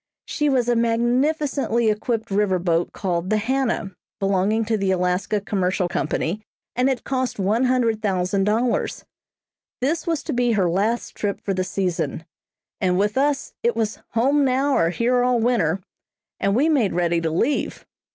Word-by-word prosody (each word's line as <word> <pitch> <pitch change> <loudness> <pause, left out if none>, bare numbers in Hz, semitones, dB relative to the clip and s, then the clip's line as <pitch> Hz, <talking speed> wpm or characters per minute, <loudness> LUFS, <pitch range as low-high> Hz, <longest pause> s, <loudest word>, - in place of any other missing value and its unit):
She 295 -1 0
was 255 -3 +2
a 240 - +2
magnificently 240 +1 +1
equipped 220 0 -2
river 195 -2 +2
boat 170 -1 0
called 180 -1 -2
the 215 - +2
"Hannah," 230 -3 -1 0.3
belonging 200 +3 +1
to 220 +1 0
the 195 -2 0
Alaska 180 +3 0
Commercial 190 -2 -1
Company, 170 +4 -2 0.3
and 255 +2 +2
had 255 -3 -2
cost 260 -1 -2
one 210 +6 +1
hundred 240 -4 +1
thousand 195 -1 0
dollars. 230 +3 0 0.7
This 315 +7 -1
was 330 -3 -1
to - - -3
be 245 -1 +2
her 195 -4 +2
last 210 +7 0
trip 205 -1 -3
for 195 - -2
the 185 0 0
season, 180 -3 -2 0.5
and 180 -1 +1
with 205 +2 +1
us 280 +1 0
it 475 +1 +1
was 220 -1 -2
"home 275 +6 +3
now, 270 +2 +2
or 165 - +3
here 240 +7 +1
all 250 -1 +2
winter," 195 -7 +1 0.6
and 195 +1 +1
we 280 +6 +3
made 270 -11 +2
ready 170 -1 +1
to 165 - 0
leave. 230 - -1
220 Hz, 165 wpm, -22 LUFS, 190-250 Hz, 0.7 s, home